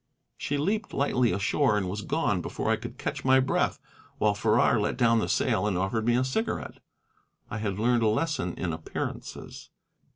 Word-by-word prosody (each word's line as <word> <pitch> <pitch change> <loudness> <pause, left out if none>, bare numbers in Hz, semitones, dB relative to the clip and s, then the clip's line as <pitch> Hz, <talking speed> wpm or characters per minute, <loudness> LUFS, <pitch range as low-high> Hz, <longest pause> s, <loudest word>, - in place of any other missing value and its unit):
She 145 - -2
leaped 205 +10 -1
lightly 125 -4 +2
ashore 100 +2 +2
and 95 -3 -1
was 100 +3 -3
gone - - 0
before - - -2
I - - +4
could - - -8
catch - - -4
my 130 0 +5
breath, 130 - +1 0.4
while 105 -1 +2
Farrar 110 +2 +3
let 105 - -1
down 115 -2 +4
the - - -1
sail 100 +3 +1
and 95 -4 0
offered 105 +5 -1
me 120 - +4
a 125 - +2
cigarette. 220 - -2 0.7
I 110 - -3
had 100 -3 -2
learned 120 +2 +2
a 110 - +3
lesson 150 +6 0
in 85 -3 -2
appearances. 80 0 -6
110 Hz, 185 wpm, -27 LUFS, 105-130 Hz, 0.7 s, my